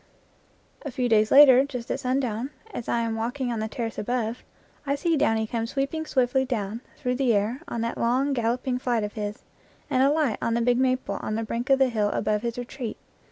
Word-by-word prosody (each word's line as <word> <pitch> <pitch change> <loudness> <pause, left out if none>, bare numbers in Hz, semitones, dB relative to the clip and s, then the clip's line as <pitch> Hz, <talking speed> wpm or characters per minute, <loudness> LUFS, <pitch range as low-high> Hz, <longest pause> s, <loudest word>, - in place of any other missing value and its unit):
A 290 - -5
few 250 -1 -1
days 215 -2 +3
later, 270 -2 +8
just 250 -4 -5
at - - -1
sundown, 255 -2 -1 0.2
as 235 - -5
I 235 - +1
am 225 -1 -1
walking 245 +3 -2
on 230 - -2
the 220 - -2
terrace 225 0 -4
above, 240 +1 -2 0.4
I 280 -1 0
see 330 +3 +1
Downy 225 -6 +2
come 230 +1 -2
sweeping 280 +5 -2
swiftly 260 0 +2
down 225 -3 -3 0.2
through 250 0 -1
the 255 -4 +2
air 215 +7 0
on 235 - -3
that 230 0 -3
long 260 +4 +1
galloping 250 +1 -1
flight 240 -4 0
of 210 - -4
his, 210 -1 -5 0.5
and 260 -2 +3
alight 280 -4 +2
on 230 - 0
the 235 - +1
big 245 +1 +2
maple 255 -6 0
on 215 - -3
the 225 - -1
brink 235 +3 -4
of 270 - +6
the 265 -1 +3
hill 215 -3 +1
above 210 0 0
his 235 0 -3
retreat. 245 -1 -5
245 Hz, 210 wpm, -26 LUFS, 225-265 Hz, 0.5 s, later